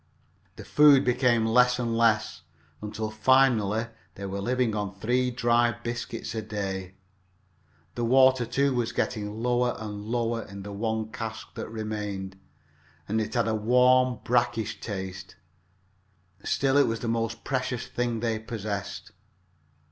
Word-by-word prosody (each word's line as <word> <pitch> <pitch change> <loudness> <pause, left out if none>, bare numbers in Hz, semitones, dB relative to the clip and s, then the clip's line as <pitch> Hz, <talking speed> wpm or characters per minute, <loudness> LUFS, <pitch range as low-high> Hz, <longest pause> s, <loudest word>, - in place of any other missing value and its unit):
The - - -10
food 145 -2 +6
became 125 -2 +2
less 125 +2 +4
and 120 -2 -1
less, 115 -2 +2 0.4
until 110 +1 -4
finally 115 -2 +3 0.3
they 100 - -7
were 100 +1 -4
living 125 0 0
on 100 -2 -3
three 125 +5 0
dry 120 -1 +2
biscuits 120 -1 -5
a 110 - -2
day 100 -3 -4
each. 90 - -19 1.0
The 120 - -2
water, 130 0 +4
too, 135 +3 +1
was 120 -2 -1
getting 110 0 -2
lower 125 0 +1
and 105 -2 -6
lower 115 0 -1
in 100 -2 -9
the 100 0 -7
one 110 +1 -2
cask 110 -1 -6
that - - -6
remained, 105 -3 -5 0.7
and 110 +2 0
it 110 +2 -4
had 115 -2 +2
a 110 - +1
warm, 125 +2 +3
brackish 115 -3 0
taste. 95 -2 -6 1.1
Still 135 0 +1
it 145 - +5
was 115 0 -2
the 120 - -3
most 115 0 -2
precious 125 -2 -2
thing 120 -2 -2
they 115 -2 -1
possessed. 105 -3 -5
115 Hz, 145 wpm, -27 LUFS, 105-125 Hz, 1.1 s, food